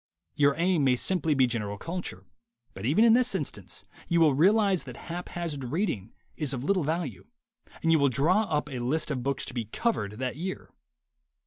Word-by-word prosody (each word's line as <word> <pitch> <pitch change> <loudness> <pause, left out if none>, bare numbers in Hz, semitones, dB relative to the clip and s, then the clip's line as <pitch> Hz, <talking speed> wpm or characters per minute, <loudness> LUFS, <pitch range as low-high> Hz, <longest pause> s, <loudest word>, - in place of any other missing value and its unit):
Your 140 -1 +3
aim 170 -2 +2
may 130 -2 +4
simply 160 +2 +1
be 130 -1 +5
general 105 -4 -2
culture, 165 - -5 0.5
but 95 +4 -4
even 160 - +4
in 225 - +7
this 250 +1 +3
instance - - -5 0.2
you 170 -1 +2
will 155 -4 +5
realize 195 +4 +3
that 125 -3 -9
haphazard 170 -4 -5
reading 125 - -2 0.2
is 145 -3 -1
of 125 - -5
little 185 +2 +2
value, 165 +4 -3 0.6
and 165 - +3
you 160 - +5
will 140 -1 +4
draw 170 - +3
up 150 -5 -1
a 130 -4 -5
list 145 +6 -1
of 130 -4 -2
books 135 +1 -1
to - - -7
be 120 -3 -2
"covered" 105 - -1
that 125 +4 -4
year. 185 +4 -5
150 Hz, 190 wpm, -28 LUFS, 125-180 Hz, 0.6 s, in